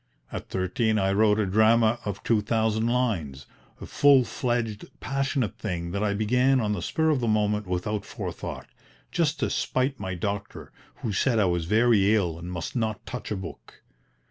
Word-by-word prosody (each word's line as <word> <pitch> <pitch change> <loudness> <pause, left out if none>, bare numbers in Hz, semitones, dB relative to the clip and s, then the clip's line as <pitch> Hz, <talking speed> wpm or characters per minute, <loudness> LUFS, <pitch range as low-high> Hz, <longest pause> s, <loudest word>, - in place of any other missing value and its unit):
At - - -6
thirteen 95 +4 0
I 95 -1 +2
wrote 105 +1 +4
a 105 - +2
drama 110 +3 +3
of 100 -2 -4
2000 110 0 +1
lines, 95 - -1 0.3
a - - -7
full 140 -2 +5
fledged 120 -3 -2
passionate 135 -3 -2
thing 85 -4 -3
that 100 +2 -2
I 100 -1 0
began 125 +5 +3
on 105 -3 0
the 95 - -3
spur 160 - +1
of 145 - +1
the 120 - -1
moment 105 -1 +1
without 100 +3 -2
forethought, - - -6 0.5
just 155 -2 0
to - - 0
spite 130 +1 -1
my 95 -2 -4
doctor 100 +3 -5 0.3
who 110 - -1
said 120 +5 +2
I 105 - +4
was 85 -2 0
very 110 +1 +4
ill 85 -6 -1
and 85 +1 -7
must 85 -2 -5
not 110 -3 -2
touch 125 - -6
a 105 - -1
book. 95 - -10
110 Hz, 175 wpm, -26 LUFS, 95-120 Hz, 0.5 s, full